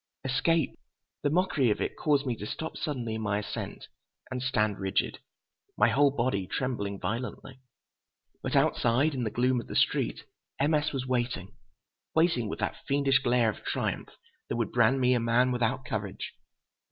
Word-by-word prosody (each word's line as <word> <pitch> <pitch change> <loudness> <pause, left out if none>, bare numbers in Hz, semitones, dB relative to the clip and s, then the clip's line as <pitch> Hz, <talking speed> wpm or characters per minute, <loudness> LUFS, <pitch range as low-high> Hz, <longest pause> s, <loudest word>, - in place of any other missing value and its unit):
Escape! 135 +4 +1 0.4
The 145 - +1
mockery 155 -6 +2
of 105 - +1
it - - -2
caused 145 -2 +2
me 125 -3 0
to 105 - -6
stop 160 +7 -5
suddenly 125 -7 -3
in 110 - -3
my 105 -2 0
ascent 105 - -5 0.4
and 130 -1 -2
stand 110 -6 +1
rigid, 95 -1 0 0.6
my - - +5
whole 145 +1 +5
body 120 -8 0
trembling 100 -6 -2
violently. 125 +5 -4 0.8
But - - -2
outside, 130 +6 +3
in 125 -3 -2
the - - 0
gloom 125 +2 +1
of - - -13
the - - -6
street, - - +1 0.3
M. 145 +3 +3
S. 150 0 +2
was 135 -2 -3
waiting, 120 -6 -2 0.6
waiting 160 -9 +3
with - - -4
that - - -2
fiendish 140 -1 +3
glare 120 -2 +3
of - - -13
triumph - - -2 0.4
that - - -1
would 115 -2 -1
brand 120 +2 +4
me 125 0 +4
a 125 - +3
man 120 +2 +3
without 125 +2 0
courage. 100 -3 -4
125 Hz, 170 wpm, -29 LUFS, 110-135 Hz, 0.8 s, my